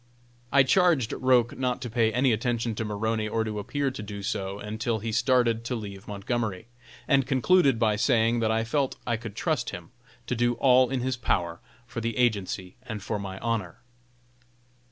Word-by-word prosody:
I 140 - +6
charged 155 - +3
Roch 125 -2 +2
not 125 -1 -1
to 120 - -4
pay 115 -1 +2
any 125 +2 +3
attention 115 0 -1
to 110 - -3
Maroney 110 +1 -1
or 110 +1 0
to 105 -1 -3
appear 140 +6 -1
to 130 - -7
do 100 -1 -7
so 95 0 -3
until 110 +2 -2
he 110 +1 -4
started 120 -1 +2
to 125 - -2
leave 100 -3 -7
Montgomery, 105 0 -3 0.4
and 135 -3 +3
concluded 140 0 +4
by 110 -2 +2
saying 115 -1 +2
that 110 -1 +1
I 110 0 +1
felt 135 +3 0
I 120 - +1
could 110 -2 -7
trust - - -1
him - - -8 0.3
to - - -2
do 120 +1 +1
all 130 0 +4
in 130 -1 -1
his 130 0 -1
power 85 -7 -1 0.3
for 120 0 -6
the 115 -1 -2
agency 100 -6 0
and 110 -5 -7
for 105 0 -2
my 95 -1 -6
honor. 110 -7 -2
115 Hz, 185 wpm, -27 LUFS, 105-125 Hz, 0.4 s, I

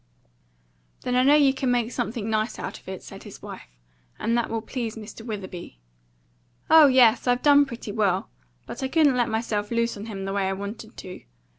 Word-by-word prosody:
"Then 250 - -2
I 250 - +4
know 280 +3 +6
you 280 -3 +5
could 265 -1 -2
make 240 -1 +1
something 230 -3 -3
nice 215 +1 -1
out - - -6
of - - -27
it," 190 - -7
said - - -11
his - - -12
wife; - - -9 0.5
"and 230 - 0
that 235 -1 0
will 225 -1 -3
please 235 -2 -4
Mr. 220 0 -10
Witherby." 190 - -7 0.9
"Oh 320 -2 +9
yes, 255 -3 +5
I've 245 0 +2
done 285 -1 +6
pretty 235 -4 -7
well; 200 -3 0 0.4
but 255 - -8
I 265 - 0
couldn't 295 -2 +3
let 240 -2 +1
myself 220 -2 -2
loose 235 0 0
on 205 +2 -7
him 195 -3 -6
the 195 - -3
way 195 -1 0
I - - -1
wanted 200 +3 -7
to. 185 - -9
230 Hz, 200 wpm, -25 LUFS, 210-250 Hz, 0.9 s, Oh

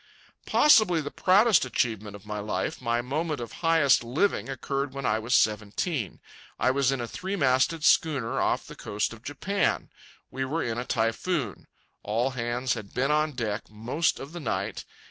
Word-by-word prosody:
Possibly 215 - +5
the 145 -2 -4
proudest 200 +1 +4
achievement 110 -5 -2
of 100 0 -13
my 105 0 -4
life, 110 +9 -3
my 120 0 0
moment 150 +3 -2
of 120 -1 -6
highest 165 -7 +4
living, 135 +7 0
occurred 135 +1 -3
when 135 -1 -4
I 110 +1 +2
was 115 +3 0
seventeen. 105 - 0 0.4
I 130 - +3
was 135 0 +2
in 135 - -1
a 120 - -3
three 190 - -4
masted 140 +1 +2
schooner 145 -8 +2
off - - 0
the - - -10
coast 105 +2 -2
of 115 - -13
Japan. 185 +10 -1 0.4
We 130 +1 -3
were 150 +5 -1
in 115 0 -2
a 125 - -4
typhoon. 115 - -1 0.3
All 115 +6 0
hands 120 0 -1
had 105 -4 -8
been 135 +3 +1
on 150 0 +1
deck 115 -4 -3
most 115 +10 -1
of 140 - -8
the 175 - -7
night. 145 - -3
130 Hz, 175 wpm, -27 LUFS, 115-155 Hz, 0.4 s, Possibly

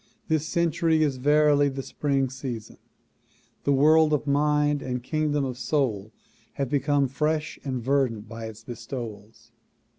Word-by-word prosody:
This 155 -1 +1
cen 170 0 +1
tury 160 0 +2
is 145 -4 +1
verily 145 +1 +4
the 135 0 -5
spring 135 -2 0
season. 125 -4 -6 0.9
The 140 - +3
world 155 +3 +5
of 150 - 0
mind 150 0 +2
and 125 -2 -4
kingdom 150 0 0
of 125 -1 -5
soul 120 -7 -1 0.4
have 140 -3 -2
become 145 0 +2
fresh 150 +3 -1
and 130 -4 -3
verdant 125 -5 0
by 115 0 -7
its 110 0 -9
bestowals. 115 -2 -8
140 Hz, 145 wpm, -26 LUFS, 125-150 Hz, 0.9 s, world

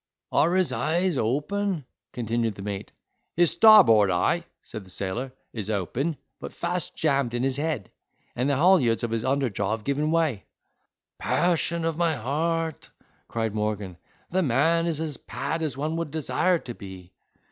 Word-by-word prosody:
"Are 170 +4 +3
his 185 -2 +2
eyes 175 +1 0
open," 150 - -1 0.3
continued 115 -2 -1
the 95 - -8
mate. 100 -1 -5 0.4
"His 175 -1 +4
starboard 170 - +7
eye," 165 - +1 0.2
said 110 - -8
the 95 - -16
sailor, 100 +8 -4 0.2
"is 110 -3 -5
open, 120 - -1 0.2
but - - -7
fast 175 -1 -2
jammed 140 -6 +1
in 120 - -1
his 135 0 0
head: 145 - -2 0.4
and 125 +3 0
the 140 - +2
haulyards 140 -8 +4
of 115 - -1
his 115 0 -1
under 135 -2 +1
jaw 100 +2 -1
have 110 - -17
given 145 +4 0
way." 160 -10 +1 0.7
"Passion 170 -1 +1
of 165 -1 -1
my 170 -2 +2
heart!" 160 +6 -2 0.4
cried 115 -2 -2
Morgan, 105 -3 -2 0.4
"the 190 +2 +2
man 165 +4 +2
is 160 -3 -1
as 155 -3 -3
pad 165 - -4
as 150 -5 -2
one 155 +3 -2
would 165 -2 -2
desire 160 +4 +1
to 125 -6 -8
be! 95 -3 -11
140 Hz, 165 wpm, -26 LUFS, 115-165 Hz, 0.7 s, starboard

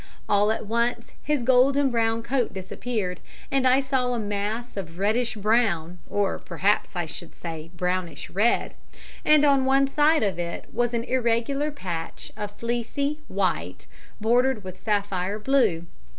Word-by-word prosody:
All 205 +1 +3
at 220 - -2
once 235 +2 -1
his 295 -3 0
golden 265 +2 +4
brown 225 -1 +1
coat 245 -3 0
disappeared, 190 0 -3 0.3
and 270 -1 +3
I 255 +2 +5
saw 260 -2 0
a - - -1
mass 210 +3 -3
of 170 -4 -6
reddish 220 +5 +1
brown 200 -6 +1
or 205 -1 0
perhaps 195 +4 0
I 175 -1 -1
should 160 +2 -9
say 165 -1 -7
brownish 180 0 -2
red, 215 +5 +2 0.5
and 300 -1 +5
on 275 -2 +4
one 270 +1 +4
side 300 +1 +3
of 190 -4 -1
it 170 0 -4
was 240 0 0
an 230 - 0
irregular 255 +4 0
patch 175 - -6
of 210 -1 -4
fleecy 240 +6 -2
white, 190 -1 -2 0.3
bordered 240 +1 +2
with 185 0 -9
sapphire 200 -2 -1
blue. 215 -8 +2
225 Hz, 150 wpm, -25 LUFS, 190-255 Hz, 0.5 s, I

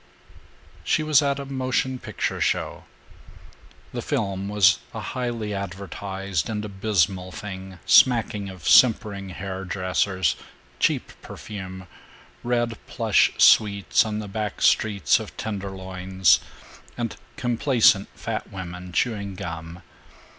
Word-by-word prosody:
III - - -26
She 155 - +1
was 155 -2 +5
at 140 -1 0
a 140 - -5
motion 130 -1 -1
picture - - -3
show. - - -1 1.1
The - - -3
film 100 0 -2
was 100 -4 +4 0.2
a - - -3
highly 120 -4 -3
advertised 95 -1 -4
and 105 -1 -3
abysmal 95 -2 0
thing 95 -1 -8
smacking 110 -5 +4
of 95 -1 -9
simpering 105 -5 +4
hair 95 +1 -6
dressers, 95 -3 0 0.4
cheap - - +1
perfume, 95 -3 -8 0.6
red 120 -2 -1
plush - - +3
suites 100 +1 +5
on 110 -2 -3
the 105 -1 -5
back 105 +1 -4
streets 100 -9 +3
of - - -9
tenderloins, 95 -3 0 0.6
and 115 -2 -3 0.2
complacent 120 -4 +3
fat - - -5
women 90 -1 -7
chewing 100 -4 -1
gum. 85 0 -7
100 Hz, 115 wpm, -24 LUFS, 95-110 Hz, 1.1 s, was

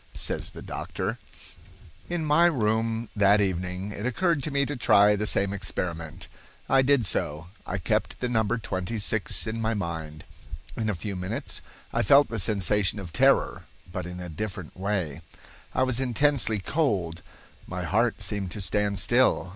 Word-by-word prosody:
Says - - -1
the - - -10
doctor: 105 +6 -4 0.9
"In 175 -2 -1
my 155 +3 +5
room 115 -4 0
that 100 0 +5
evening 90 0 -1
it 105 0 -6
occurred 145 +6 +1
to 145 - -3
me 140 -1 +2
to 145 - -3
try 105 -4 +5
the 105 +1 -1
same 100 -1 +1
experiment. 85 -5 -4 0.4
I 135 - +5
did 130 -3 +3
so. 85 -2 -1 0.2
I 95 - -2
kept 90 - -1
the 125 - -1
number 115 -1 +1
twenty 100 0 -3
six 105 0 -1
in 115 0 -3
my 110 0 0
mind. 80 -5 -4 0.5
In 110 -2 -1
a 105 - 0
few 100 +3 -4
minutes 90 +1 -4 0.3
I - - +2
felt 140 +7 +6
the 115 - -3
sensation 100 +1 +2
of 85 -4 -8
terror, - - +3 0.3
but 90 0 -4
in 90 0 -7
a 90 - -6
different 90 0 -5
way. 90 -6 -2 0.5
I - - +2
was 130 -2 +2
intensely 130 -2 +2
cold. 95 - 0 0.5
My 90 0 -4
heart 110 +4 +1
seemed 100 -1 -2
to - - -6
stand 100 +1 +1
still. 120 -1 +3
105 Hz, 165 wpm, -27 LUFS, 90-120 Hz, 0.9 s, felt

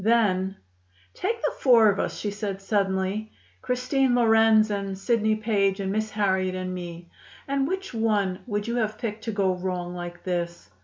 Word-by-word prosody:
Then: 195 -4 +2 0.6
"Take 450 +4 -2
the - - +1
four 235 -4 +6
of 200 - -4
us," - - -2
she 205 - -3
said 200 -1 -4
suddenly, 195 +1 -1 0.3
"Christine 255 +1 +1
Lorenz 225 -2 +5
and 195 -1 -3
Sidney 220 +1 +1
Page 205 -3 +1
and 195 -1 -2
Miss 215 +1 -1
Harriet 190 -3 0
and 185 0 -3
me, 175 -1 -7 0.4
and 275 0 0
which 380 -1 -4
one 210 -5 +1
would 205 -1 -2
you 235 +1 -1
have 215 -2 -1
picked 220 -1 -5
to 225 - -1
go 195 -3 +1
wrong 180 -1 -3
like 175 0 -7
this? 170 - -3
205 Hz, 170 wpm, -26 LUFS, 190-225 Hz, 0.6 s, four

